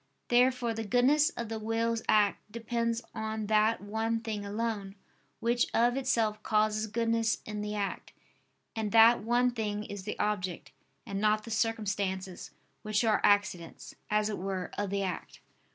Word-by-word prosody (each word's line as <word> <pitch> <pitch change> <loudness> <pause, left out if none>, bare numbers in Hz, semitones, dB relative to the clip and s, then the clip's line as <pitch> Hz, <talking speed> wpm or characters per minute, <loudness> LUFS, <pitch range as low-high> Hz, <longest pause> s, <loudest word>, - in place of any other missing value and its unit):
Therefore 245 -1 +3
the 225 0 -4
goodness 260 +8 +3
of 235 - -3
the 220 0 -4
will's 225 +1 -1
act 210 0 +2
depends 230 +1 -2
on 220 0 -3
that 215 +1 +2
one 220 +2 -1
thing 215 -2 -4
alone, 205 -1 -3 0.4
which 235 +1 +1
of 240 +2 +3
itself 230 -5 0
causes 215 0 +1
goodness 230 +1 +1
in 210 0 -5
the 210 0 -3
act; 200 -1 -3 0.6
and 220 -2 -2
that 230 +1 +7
one 245 +2 +2
thing 210 -3 -3
is 205 -2 -7
the 210 - -4
object, 185 -4 -2 0.3
and 195 0 -4
not 215 0 +2
the 230 - -9
circumstances, 200 -4 -2 0.3
which 215 +1 0
are 220 -2 +2
accidents, 190 -5 +1 0.2
as 210 0 +2
it 215 - -3
were, 190 -1 -3
of 205 -1 -2
the 200 0 -1
act. 185 -2 -5
215 Hz, 155 wpm, -30 LUFS, 205-230 Hz, 0.6 s, that